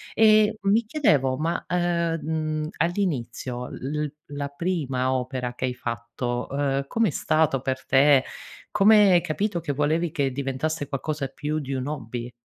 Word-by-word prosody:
E 215 -1 +5
mi 210 +4 +3
chiedevo, 145 - +2
ma, 165 +4 -1
ehm, 170 -2 0
mhmm, 155 -1 -2
all'inizio 130 - -2
l 150 +3 -4
l 145 - -6 0.2
la 145 0 -3
prima 140 -5 -1
opera 125 -1 -3
che 125 - -3
hai 125 -1 -2
fatto, 120 0 -4
uhm, 140 0 -1
com'è 225 -1 +1
stato 155 -3 +1
per 130 0 -3
te, 135 0 +5 0.5
come 210 0 +6
hai 175 -1 +5
capito 175 +3 -1
che 165 -3 -3
volevi 155 +4 +1
che 140 -5 -1
diventasse 140 +3 -2
qualcosa 145 0 -3
più 150 +3 -3
di 135 -2 -5
un 130 0 -3
hobby? 120 -4 -5
145 Hz, 155 wpm, -25 LUFS, 130-170 Hz, 0.5 s, come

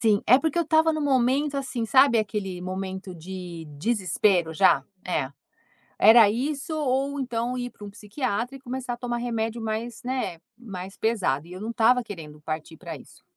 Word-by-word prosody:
Sim, 215 -3 +3
é 250 - +8
porque 320 +3 -1
eu 340 - +2
estava 320 +1 +4
num 310 - -2
momento, 275 +1 +2
assim, 255 -4 -2
sabe 265 -1 +5
aquele 195 -4 -2
momento 190 +1 -5
de 175 -1 -8
desespero 185 -3 +1
já? 140 -3 +4 0.2
É. 140 -7 -1 0.7
Era 220 0 +8
isso 280 +7 -2
ou 280 -1 0
então 245 -1 -2
ir 245 0 -3
pra 205 - -13
um 205 - -7
psiquiatra 235 +4 -3
e - - -13
começar 255 -1 -4
a - - -9
tomar 240 0 -3
remédio 230 -1 -2
mais, 225 +2 -4
né, 250 -10 -2 0.2
mais 195 -5 -8
pesado. 185 -10 0
E 175 - -12
eu 185 - -8
não 220 +2 -4
estava 240 +2 +4
querendo 160 -9 -9
partir 155 +1 -5
pra - - -7
isso. - - -16
225 Hz, 180 wpm, -26 LUFS, 190-255 Hz, 0.7 s, é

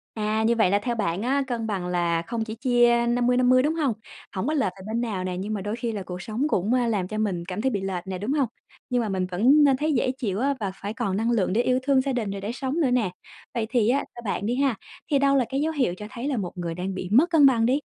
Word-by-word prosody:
À, 215 0 0
như 230 +2 +3
vậy 220 -5 +3
là 200 - +3
theo 240 +1 -1
bạn 200 -4 -1
á, 270 +4 +1
cân 235 -3 -3
bằng 195 -5 -2
là 170 -2 0
không 225 +6 -3
chỉ 220 0 -6
chia 240 -1 +3
50/50, 245 +1 +3
đúng 300 +3 +1
hông? 295 -6 +1 0.4
Hổng 190 +3 -3
có 305 - 0
lệch 280 -3 +1
về 190 - -11
bên 225 +2 -2
nào 210 -6 -2
nè, 185 -1 -3
nhưng 200 +4 -3
mà 205 - -3
đôi 205 +3 -3
khi 235 -1 -3
là 205 -2 -4
cuộc 180 -1 -7
sống 230 +10 -1
cũng, 210 -2 +1
ờ, 250 -2 +2
làm 205 -6 -1
cho 215 - -4
mình 190 -5 -1
cảm 185 +3 -5
thấy 265 +4 +1
bị 205 -5 -1
lệch 190 -1 -4
nè, 190 -1 -4
đúng 210 +8 -2
hông? 285 -4 +1 0.4
Nhưng 250 -1 +2
mà 220 - -2
mình 190 -2 -1
vẫn 255 +12 +5
nên 275 -2 +4
thấy 305 +3 0
dễ 255 -1 +1
chịu 225 -7 -3
á 280 +2 +1
và 200 -3 -1
phải 200 +2 -6
còn 220 -5 -1
năng 225 +3 0
lượng 215 -6 +1
để 220 - +2
yêu 255 +1 +2
thương 270 0 +3
gia 270 +1 -1
đình, 230 -5 -2
rồi 200 0 -5
để 205 +4 -4
sống 270 +5 -2
nữa 280 -6 +2
nè. 240 -7 +1 0.4
Vậy 230 -2 -1
thì 235 -4 +2
á 260 +3 +3 0.2
theo 240 - -9
bạn 205 -1 -2
đi 235 - 0
ha, 270 -2 +2 0.4
thì 285 - +4
đâu 275 0 +3
là 260 - +3
cái 270 +1 -1
dấu 315 +2 0
hiệu 260 - 0
cho 210 - -8
thấy 250 +3 -4
là 280 - 0
một 190 -6 -3
người 170 -1 -3
đang 185 +2 -4
bị 185 -1 -5
mất 295 +10 +5
cân 310 -5 +6
bằng 235 -4 +4
đi? 265 +4 +2
230 Hz, 300 wpm, -25 LUFS, 195-260 Hz, 0.4 s, cân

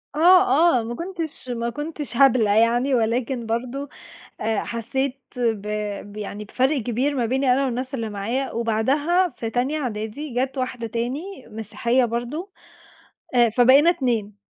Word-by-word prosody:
آه، 335 -3 +5
آه، 230 - -3
ما 235 +1 -5
كنتش 330 -5 -6
ما 235 -1 -2
كنتش 295 -1 -5
هبلة 250 -6 +5
يعني، 235 +5 +3
ولكن 235 +1 0
برضو 250 +5 -3 0.5
أ 220 -1 0
حسيت 260 +4 -2 0.2
ب 225 -4 -1 0.5
بيعني 210 0 -6
بفرق 265 +7 +1
كبير 250 +5 -1
ما 245 -4 0
بيني 260 +2 +2
أنا 275 +2 +2
والناس 260 +1 -3
اللي 225 -4 -3
معايا، 230 +7 -2
وبعدها 275 +11 +1
في 225 - -4
تانية 260 +6 0
إعدادي 235 +2 -4
جات 260 +2 -1
واحدة 250 -2 -3
تاني 260 - -4
مسيحية 225 +3 0
برضو 240 - -3 0.8
أ 240 -1 +5
فبقينا 260 +8 +6
2، 225 - -1
250 Hz, 140 wpm, -23 LUFS, 230-275 Hz, 0.8 s, فبقينا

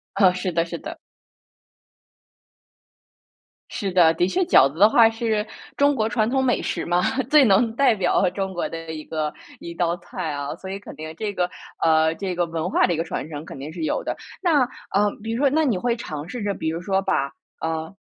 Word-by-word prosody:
啊， 185 -3 +5
是 185 0 -3
的 165 0 +1
是 170 - -6
的。 - - -8 2.7
是 200 -4 -3
的， 175 -3 +6
的 175 +2 +1
确 370 - 0
饺 330 - +5
子 150 - -12
的 205 +3 +8
话 225 0 +6
是 225 -2 -1 0.3
中 285 0 +4
国 220 -4 0
传 225 -2 +1
统 265 +2 +1
美 245 - +2
食 - - -2
嘛， 175 +1 +1 0.3
最 300 -2 +7
能 225 +1 +3
代 255 -1 +4
表 190 -1 +2
中 190 +1 -3
国 175 - -2
的 165 -1 -7
一 155 -1 -7
个 155 -2 -3 0.3
一 170 - -7
道 170 0 0
菜 175 -1 -5
啊， 145 0 -4
所 190 +2 -9
以 195 - -4
肯 200 - -11
定 155 +1 -8
这 210 +2 -3
个， 180 -2 0 0.3
呃， 160 0 +4
这 185 +1 -4
个 175 0 +1
文 165 +1 -3
化 - - +3
的 - - 0
一 - - 0
个 165 - -1
传 165 - -5
承 150 0 -6
肯 150 - -9
定 145 +4 -7
是 165 -1 -4
有 - - -1
的。 - - -3 0.3
那， 325 -7 +4 0.3
呃， 205 +1 +3
比 225 +1 -4
如 230 - -2
说 280 +1 +4
那 315 +3 +2
你 235 -10 +1
会 235 +4 0
尝 155 -8 -6
试 245 +2 -5
着 205 -1 -1
比 160 - -3
如 165 +1 -2
说 190 +1 0
把 140 -8 -1 0.3
呃， 160 +2 -3
185 Hz, 235 characters per minute, -23 LUFS, 165-225 Hz, 2.7 s, 的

